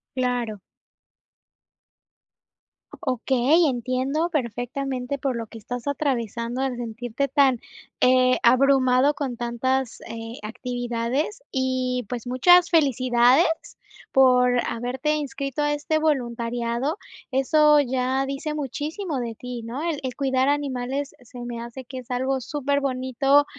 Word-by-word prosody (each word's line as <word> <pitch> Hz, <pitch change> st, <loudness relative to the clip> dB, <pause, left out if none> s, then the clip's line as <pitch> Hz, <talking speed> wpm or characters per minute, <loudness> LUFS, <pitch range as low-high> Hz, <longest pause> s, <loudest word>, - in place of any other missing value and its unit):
Claro. 245 Hz, -5 st, -1 dB, 2.5 s
Okey, 265 Hz, +5 st, +3 dB
entiendo 260 Hz, +6 st, -1 dB
perfectamente, 255 Hz, 0 st, -2 dB
por 265 Hz, -2 st, -2 dB
lo 230 Hz, -1 st, -4 dB
que 225 Hz, -, -11 dB
estás 245 Hz, +4 st, -6 dB
atravesando, 245 Hz, -4 st, -2 dB
al 265 Hz, -2 st, -1 dB
sentirte 240 Hz, +3 st, -3 dB
tan, 270 Hz, -3 st, +3 dB, 0.4 s
eh, 255 Hz, 0 st, +5 dB
abrumado 255 Hz, +2 st, +4 dB
con 275 Hz, -4 st, -3 dB
tantas, 240 Hz, +2 st, -1 dB
eh, 225 Hz, +1 st, -7 dB
actividades, 245 Hz, -, -3 dB
y 255 Hz, -2 st, -1 dB
pues, 245 Hz, 0 st, -5 dB
muchas 350 Hz, +8 st, +5 dB
felicidades 255 Hz, -1 st, +4 dB, 0.6 s
por 250 Hz, -2 st, +5 dB
haberte 255 Hz, +6 st, -1 dB
inscrito 275 Hz, -1 st, -3 dB
a 295 Hz, 0 st, +2 dB
este 295 Hz, +2 st, 0 dB
voluntariado. 240 Hz, -, -1 dB, 0.3 s
Eso, 300 Hz, +3 st, +4 dB
ya 260 Hz, +1 st, 0 dB
dice 275 Hz, +3 st, -3 dB
muchísimo 300 Hz, -, -3 dB
de 235 Hz, -2 st, -4 dB
ti, 245 Hz, 0 st, -7 dB
¿no?, 240 Hz, +6 st, -5 dB
el 330 Hz, -4 st, -1 dB
el 255 Hz, -2 st, -4 dB
cuidar 265 Hz, -1 st, +1 dB
animales, 275 Hz, -1 st, -1 dB
se 245 Hz, 0 st, -11 dB
me 235 Hz, -1 st, -5 dB
hace 235 Hz, +3 st, -8 dB
que 260 Hz, +2 st, -8 dB
es 250 Hz, 0 st, -13 dB
algo 260 Hz, +2 st, 0 dB
superbonito, 275 Hz, 0 st, +1 dB
255 Hz, 115 wpm, -24 LUFS, 245-280 Hz, 2.5 s, eh